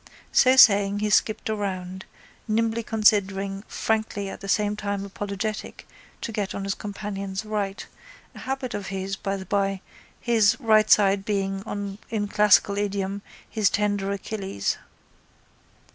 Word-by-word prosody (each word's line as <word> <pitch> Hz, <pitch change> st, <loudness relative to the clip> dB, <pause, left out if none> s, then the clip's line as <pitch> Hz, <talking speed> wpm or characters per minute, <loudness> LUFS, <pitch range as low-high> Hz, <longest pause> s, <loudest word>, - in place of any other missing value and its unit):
So 260 Hz, 0 st, +5 dB
saying 200 Hz, -5 st, +6 dB
he 210 Hz, 0 st, -1 dB
skipped 215 Hz, +1 st, +2 dB
around, 190 Hz, -3 st, -4 dB, 0.4 s
nimbly 225 Hz, +1 st, +1 dB
considering, 200 Hz, -3 st, +1 dB
frankly 220 Hz, -2 st, -1 dB
at -, -, -9 dB
the 195 Hz, -, -7 dB
same 210 Hz, 0 st, +1 dB
time 200 Hz, -1 st, -3 dB
apologetic 205 Hz, +2 st, -5 dB, 0.3 s
to -, -, -4 dB
get 205 Hz, -3 st, -3 dB
on 200 Hz, -, -4 dB
his 195 Hz, 0 st, -1 dB
companion's 200 Hz, -1 st, -5 dB
right, 205 Hz, -2 st, -3 dB, 0.5 s
a -, -, -11 dB
habit 265 Hz, -2 st, -4 dB
of 205 Hz, -2 st, -4 dB
his, 195 Hz, 0 st, -3 dB
by 195 Hz, 0 st, -3 dB
the 190 Hz, -, -8 dB
bye, 195 Hz, 0 st, 0 dB, 0.4 s
his 225 Hz, -2 st, +3 dB
right 215 Hz, -2 st, +4 dB
side 195 Hz, -1 st, +5 dB
being, 195 Hz, 0 st, -3 dB
in 210 Hz, -2 st, -1 dB
classical 205 Hz, -1 st, +4 dB
idiom, 200 Hz, -1 st, -2 dB, 0.3 s
his 215 Hz, -4 st, +1 dB
tender 205 Hz, -1 st, 0 dB
Achilles. 195 Hz, -, -3 dB
205 Hz, 135 wpm, -25 LUFS, 195-215 Hz, 0.5 s, saying